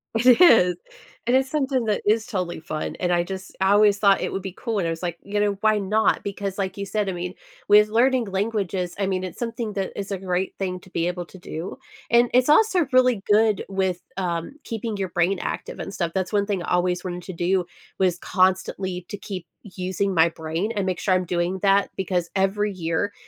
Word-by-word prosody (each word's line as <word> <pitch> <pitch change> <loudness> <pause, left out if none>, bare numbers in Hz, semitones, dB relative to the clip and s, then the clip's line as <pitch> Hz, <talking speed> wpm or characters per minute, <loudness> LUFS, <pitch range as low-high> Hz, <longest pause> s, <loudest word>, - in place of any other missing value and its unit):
It 245 +4 +5
is. 180 - +7 0.5
And 245 +2 +4
it's 265 0 0
something 270 -5 0
that 210 -1 0
is 220 +1 +2
totally 180 -8 -3
fun, 155 -1 -5
and 180 -1 +1
I 175 0 +2
just 190 0 -7
I 190 +1 +4
always 205 0 +5
thought 200 -1 +4
it - - -3
would 195 - -2
be 190 0 -5
cool, 225 +3 -3
and 175 - 0
I - - 0
was 165 - -5
like, 175 -2 -3
you 205 +1 -2
know, 205 -1 +1
why 215 -1 +4
not? 210 +3 +2
Because, 200 -1 -4
like 190 -1 -2
you 200 - -3
said, 210 0 -1
I 190 - -1
mean, 180 +1 -4 0.4
with 210 +1 +7
learning 245 +3 +2
languages, 195 -3 -2
I 195 - +1
mean, 185 -1 -1
it's 185 - -7
something 230 -2 -3
that 195 -1 -3
is 200 0 -5
a 195 - -1
great 185 0 -2
thing 180 -2 -3
to - - -17
be 170 -1 -1
able 180 0 -3
to 190 - -13
do. 175 +3 -6 0.3
And 235 0 +5
it's 255 +3 +4
also 360 -2 +4
really 255 -5 +4
good 215 -1 +4
with, 190 -2 -1 0.2
um, 175 +4 -3
keeping 225 -2 -4
your 190 -1 -2
brain 175 +2 +1
active - - -5
and 195 - -6
stuff. 170 -4 -2
That's 190 +2 -2
one 200 -1 +2
thing 200 -4 -2
I - - -5
always 180 0 +1
wanted 180 -1 -5
to 185 - -7
do, 180 +2 +1 0.3
was 180 -2 +2
constantly 185 -1 0
to - - -6
keep 185 -3 -7 0.2
using 190 0 -2
my 165 -1 +5
brain 165 +6 -3
and 200 -2 0
make 185 -2 -1
sure 190 - +1
I'm 185 0 +2
doing 175 +2 -1
that, 200 +1 +3
because 180 -3 -1
every 200 +2 +1
year, 170 +3 -2
195 Hz, 225 wpm, -24 LUFS, 180-210 Hz, 0.5 s, is